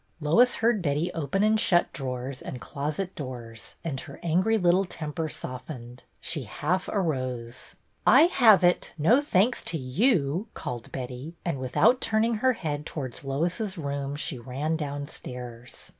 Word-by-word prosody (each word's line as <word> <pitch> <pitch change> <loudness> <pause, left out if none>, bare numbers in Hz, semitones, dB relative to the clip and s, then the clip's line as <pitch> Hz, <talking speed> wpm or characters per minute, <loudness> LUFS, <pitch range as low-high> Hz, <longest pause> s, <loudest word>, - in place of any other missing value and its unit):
Lois 195 +12 +4
heard 225 -2 +2
Betty 150 +1 0
open 165 +5 0
and 215 +1 +4
shut 175 -5 +3
drawers 130 -1 -4
and 125 - -6
closet 150 +9 -3
doors, 120 -5 -7
and 145 -5 -3
her 140 - -10
angry 185 +7 +2
little 180 0 +4
temper 160 -3 -4
softened. 125 -2 -7
She 155 - -3
half 165 - -1
arose. 130 - -3 0.3
I - - +7
have 230 - +6
it, 175 0 +2
no 220 - +5
thanks 235 -4 +2
to 165 - -1
yoii," 160 - +1
called 120 -2 -6
Betty, 130 +5 -6
and, 165 -6 -1
without 130 - +3
turning 225 +1 +2
her 260 0 +4
head 150 -8 -3
towards 130 -5 -6
Lois's 175 - -1
room, 140 -2 -3
she 145 -3 -3
ran 135 +7 -2
downstairs. 125 -5 -6
150 Hz, 145 wpm, -27 LUFS, 130-185 Hz, 0.3 s, I